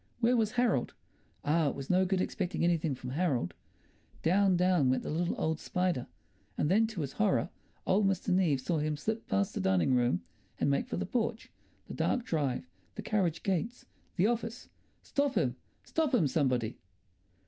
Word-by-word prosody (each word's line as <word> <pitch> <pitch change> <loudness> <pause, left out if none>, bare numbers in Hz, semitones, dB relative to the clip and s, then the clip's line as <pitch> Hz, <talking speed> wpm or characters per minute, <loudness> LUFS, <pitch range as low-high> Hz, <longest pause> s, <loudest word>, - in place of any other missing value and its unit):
Where 240 +1 +3
was 220 -2 +1
Harold? 240 - +1 0.5
Ah, 155 +1 +3
it - - -5
was 135 +3 -4
no 185 +1 +4
good 185 0 +1
expecting 185 -2 -2
anything 165 -4 +1
from 125 0 -7
Harold. 135 - 0 0.7
Down, 190 +2 +4
down 180 -7 +3
went 130 - +1
the - - -4
little 170 +3 -1
old 160 0 0
spider, 180 -8 -1 0.5
and 150 - +1
then, 220 +3 +4
to 220 -6 -5
his 140 -2 -3
horror, 200 -5 +1 0.3
old 195 +1 +3
Mr. 195 +1 -1
Neave 175 -7 +3
saw 165 +3 0
him 150 0 -1
slip 220 +9 -3
past 100 +1 0
the - - -2
dining 95 +5 +2
room 120 -9 +2 0.4
and 140 - +2
make 140 - 0
for 245 - -3
the - - -2
porch, 235 -2 -2 0.4
the - - -7
dark 245 -2 0
drive, 145 - -1 0.3
the - - -6
carriage 180 -7 0
gates, 205 +6 -2 0.3
the 180 - +3
office. 230 +1 -2 0.3
Stop 280 -1 0
him, 125 -5 +1 0.3
stop 310 -5 0
him, 190 -10 +3
somebody! 130 -5 0
175 Hz, 180 wpm, -31 LUFS, 140-215 Hz, 0.7 s, no